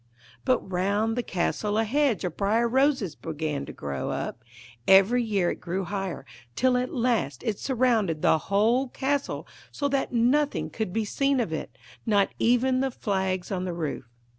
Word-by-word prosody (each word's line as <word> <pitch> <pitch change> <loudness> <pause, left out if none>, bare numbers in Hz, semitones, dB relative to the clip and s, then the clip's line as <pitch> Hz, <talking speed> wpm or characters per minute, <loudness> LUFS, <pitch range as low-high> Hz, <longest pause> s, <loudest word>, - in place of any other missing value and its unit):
But 255 - +1
round 200 +5 0
the 245 - 0
castle 205 +1 -1
a 225 - +3
hedge 265 -1 +1
of 180 -3 -3
briar 220 +4 +2
roses 260 - +2
began 150 -4 -4
to - - -6
grow 70 -2 -4
up; 120 - -4 0.4
every 195 +6 +6
year 200 -6 +1
it - - -7
grew 185 +2 -2
higher, 190 -6 -4 0.3
till 255 0 +3
at 250 0 0
last 230 - 0
it 220 -5 -2
surrounded 230 - +1
the 160 - +4
whole 225 +7 +3
castle 280 +3 -2 0.2
so 285 - -1
that 275 -1 0
nothing 260 +5 +1
could 220 -5 -3
be 220 +2 -1
seen 275 +5 +1
of 215 -10 -1
it, 160 - -5 0.3
not 205 -3 +2
even 250 +2 +3
the 270 0 +1
flags 190 -6 -2
on 185 -2 -1
the 180 -1 -3
roof. 160 -6 -4
215 Hz, 170 wpm, -26 LUFS, 185-250 Hz, 0.4 s, every